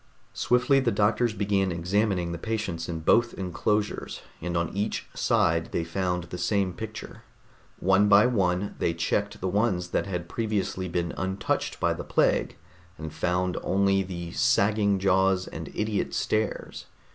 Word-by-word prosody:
Swiftly 125 +3 +3
the 130 -3 +1
doctors 110 +3 +2
began 100 -3 0
examining 90 +1 0
the 85 - -5
patients 95 -6 -3
in 80 -1 -4
both 115 +8 +3
enclosures, 105 +3 -2 0.2
and 85 +1 -2
on 85 +2 -2
each 105 +2 -2
side 80 0 +1
they 85 - -1
found 90 +1 -2
the 90 +1 -7
same 95 +1 +1
picture. 110 +4 -8 0.6
One 95 +2 +3
by 100 +1 +7
one 100 -5 +1
they 85 - 0
checked 100 +4 -1
the 95 - -1
ones 95 -3 0
that - - -1
had 90 -3 -4
previously 100 -3 -2
been 85 0 -2
untouched 95 +1 -2
by - - +2
the - - -6
plague, - - +1 0.4
and 80 -1 -7
found 90 +3 0
only 95 0 +2
the 85 -3 -6
sagging 105 -4 +2
jaws 95 0 +2
and - - -7
idiot 105 -1 -1
stares. 110 0 -2
95 Hz, 150 wpm, -27 LUFS, 90-105 Hz, 0.6 s, by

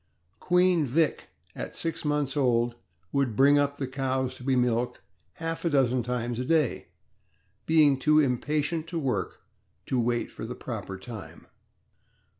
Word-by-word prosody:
Queen 180 -2 +3
Vick 150 +3 0 0.3
at - - -6
six 165 0 -3
months 150 -2 0
old 120 -4 +2 0.4
would 135 -5 0
bring 140 +3 +5
up 145 0 0
the 140 - -2
cows 130 -1 -1
to 130 - -12
be 135 0 +1
milked 125 -1 +1 0.3
half 165 0 -4
a 170 - +2
dozen 130 -4 +2
times 120 0 -2
a - - -1
day, 155 -2 +1 0.8
being 150 -4 +5
too 155 +3 +4
impatient 150 +4 0
to 170 - -4
work 125 - -2 0.4
to 130 - 0
wait 120 0 0
for - - -9
the 120 +3 -5
proper 100 -5 -6
time. 105 0 -10
135 Hz, 150 wpm, -27 LUFS, 125-150 Hz, 0.8 s, bring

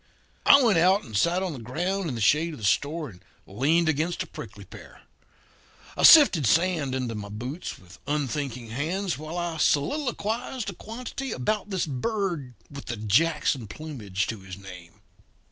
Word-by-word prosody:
"I 280 - +9
went 215 -8 +4
out 190 +4 +4
and 110 -4 -9
sat 175 - +2
on 185 -4 -3
the 135 - -8
ground 175 - -2
in 130 - -4
the 115 - -4
shade 155 +9 +3
of - - -9
the 105 - -4
store 150 +9 0
and 90 -5 -16 0.2
leaned 150 - +1
against 160 +3 0
a - - -11
prickly - - -10
pear. - - -14 0.9
I - - -3
sifted 230 - +8
sand 160 - +2
into 125 -3 -2
my 105 -1 -6
boots 125 - -6
with 90 +1 -16
unthinking 140 -4 -3
hands 170 - -2
while 155 +3 -6
I 170 -2 -3
soliloquised 235 - -1
a - - -11
quantity 250 +6 -6
about 210 - -2
this 190 -3 -1
bird 160 - -3
with 140 0 -10
the 120 - -4
Jackson 130 +3 +1
plumage 105 -9 -4
to 110 - -5
his 95 -1 -10
name. 90 -4 -12
150 Hz, 170 wpm, -26 LUFS, 120-185 Hz, 0.9 s, I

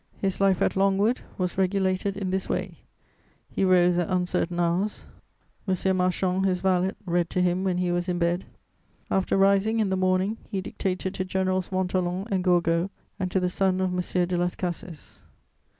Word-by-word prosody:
His 195 0 -2
life 195 -2 +3
at - - +1
Longwood 195 +4 +2 0.2
was 180 0 -2
regulated 190 +1 0
in 190 -2 -2
this 190 0 -2
way: - - -3 0.7
he - - -2
rose 180 -1 +4
at 175 - -1
uncertain 180 -1 0
hours; 175 +5 0 0.6
M. 190 0 +1
Marchand, 185 +1 +1
his 185 -2 +1
valet, 185 0 +1
read 175 -1 0
to - - -1
him 180 +1 +1
when 185 -2 0
he 180 -1 0
was 175 +1 -1
in 175 - 0
bed; 175 +1 0 0.7
after 190 0 +1
rising, 200 +3 +3
in 210 -3 +1
the 190 - +1
morning, 185 +3 +1
he 195 - -2
dictated 190 0 -3
to 185 - -2
Generals 185 0 -1
Montholon 185 0 -1
and 190 -2 +1
Gourgaud 175 0 +2 0.3
and 185 -1 -1
to 190 - +1
the 180 - 0
son 185 +1 +1
of 185 -1 0
M. 180 0 0
de 180 0 -1
Las 175 0 0
Cases. 175 -3 -6
185 Hz, 180 wpm, -26 LUFS, 180-190 Hz, 0.7 s, rose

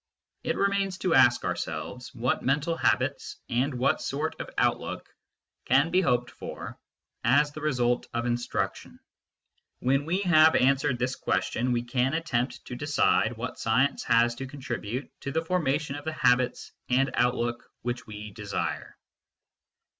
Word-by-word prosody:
It - - -1
remains 200 -1 +1
to 185 -2 0
ask 120 -5 +5
ourselves, 80 +11 -4
what 120 +2 0
mental 150 +5 +1
habits, - - 0
and 130 +3 0
what 135 +5 +1
sort 150 +3 -2
of - - -7
outlook, - - 0 0.6
can 140 +6 +3
be 185 +2 +4
hoped 125 -7 +1
for - - -8 0.4
as 140 +5 +4
the 155 - -8
result 125 -5 +1
of 120 0 -2
instruction? 120 0 -2 0.8
When 135 +3 +1
we 180 +5 0
have 160 -4 +6
answered 135 0 +3
this 125 +2 -1
question 125 +2 -1
we 120 -1 0
can 125 +4 0
attempt 135 -7 -2
to 125 - -6
decide 120 -5 +2
what 125 +3 -5
science 130 +6 +1
has 120 0 +4
to 135 - -4
contribute 130 -2 -5
to 140 - -4
the 160 +3 -1
formation 150 -4 0
of 145 +1 -8
the 160 - -2
habits 125 -3 +1 0.2
and 130 +1 +2
outlook 120 -1 0
which 120 0 -3
we 105 -1 -8
desire. - - -4
130 Hz, 145 wpm, -27 LUFS, 120-150 Hz, 0.8 s, have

